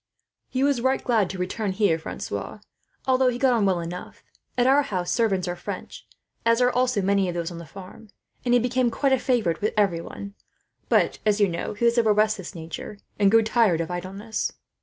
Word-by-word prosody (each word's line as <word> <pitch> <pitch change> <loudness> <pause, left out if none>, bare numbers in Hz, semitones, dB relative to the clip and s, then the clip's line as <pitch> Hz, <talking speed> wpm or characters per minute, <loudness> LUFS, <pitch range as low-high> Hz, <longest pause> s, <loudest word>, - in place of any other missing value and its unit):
"He 260 +1 0
was 280 -3 +2
glad 240 -5 +1
to 190 - -5
return 190 +2 -2
here 200 -3 +2
again, 160 - -3
Francois; - - -5 0.5
although 260 0 +3
he 245 -1 +1
got 255 0 +3
on 215 -4 +2
well 185 -2 +1
enough, 170 +2 -7 0.3
as 245 - +3
our 275 +3 +5
house 185 -10 -3
servants 195 -6 +1
are 175 - -2
French, - - -8 0.4
as 230 0 +3
are 250 0 +4
also 250 -5 +1
many 195 -1 +2
of 175 - -4
those 170 0 -3
on 170 - -7
the 170 - -10
farm, 195 +5 -12 0.3
and 245 -1 +3
he - - +5
became 245 +1 +1
quite 270 +3 +1
a 265 - +3
favourite 220 -12 0
with 210 - -1
every 190 -5 +2
one. 200 +3 -8 0.6
But - - +2
he 210 -1 +3 0.3
is 235 +2 +2
of 230 - +2
a 210 - +5
restless 210 -4 0
nature, 165 +5 -7 0.2
and 200 -1 +5
grew 225 +2 +5
tired 220 -6 +3
of 165 +1 -3
idleness." 195 +5 -4
210 Hz, 200 wpm, -25 LUFS, 185-245 Hz, 0.6 s, our